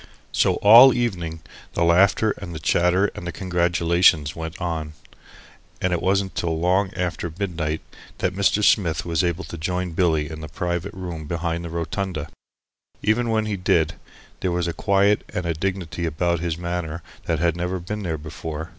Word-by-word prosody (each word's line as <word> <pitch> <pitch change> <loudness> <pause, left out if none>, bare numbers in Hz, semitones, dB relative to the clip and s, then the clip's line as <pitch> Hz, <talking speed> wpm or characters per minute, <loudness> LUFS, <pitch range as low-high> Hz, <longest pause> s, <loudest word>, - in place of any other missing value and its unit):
So - - +2
all 120 +5 +9
evening 85 -9 -2 0.3
the 85 - +1
laughter 95 +5 +4
and 85 -4 -7
the - - -5
chatter 90 +5 +2
and 85 - -7
the - - -2
congratulations 85 -3 +2
went 80 +2 -6
on, 80 -3 -3 0.9
and 90 -1 0
it 85 - -1
wasn't 95 0 +1
till 80 -2 -1
long 95 +3 +2
after 85 -2 -2
midnight 80 -5 -2 0.4
that 90 - -1
Mr. 100 +2 +2
Smith 85 -8 +3
was 85 -1 0
able 85 +1 -1
to 85 - -8
join 90 +2 -2
Billy 80 -3 +1
in 80 0 -8
the 75 - -6
private 90 +4 -3
room 85 -5 -6
behind 85 +1 -2
the 85 - -5
"rotunda." 85 -1 -3 0.7
Even 115 +3 +2
when 110 -1 +1
he 105 -2 -2
did, 80 -3 +2 0.5
there 90 - -1
was 85 0 0
a 85 - -2
quiet 100 +4 +2
and 90 - -2
a 85 - 0
dignity 85 -1 -3
about 85 +2 0
his 85 -1 -2
manner 85 -2 -4 0.2
that 85 - 0
had 85 +1 +1
never 90 +2 -2
been 105 +5 -5
there 85 -5 -2
before. 80 +1 -6
85 Hz, 175 wpm, -23 LUFS, 80-95 Hz, 0.9 s, all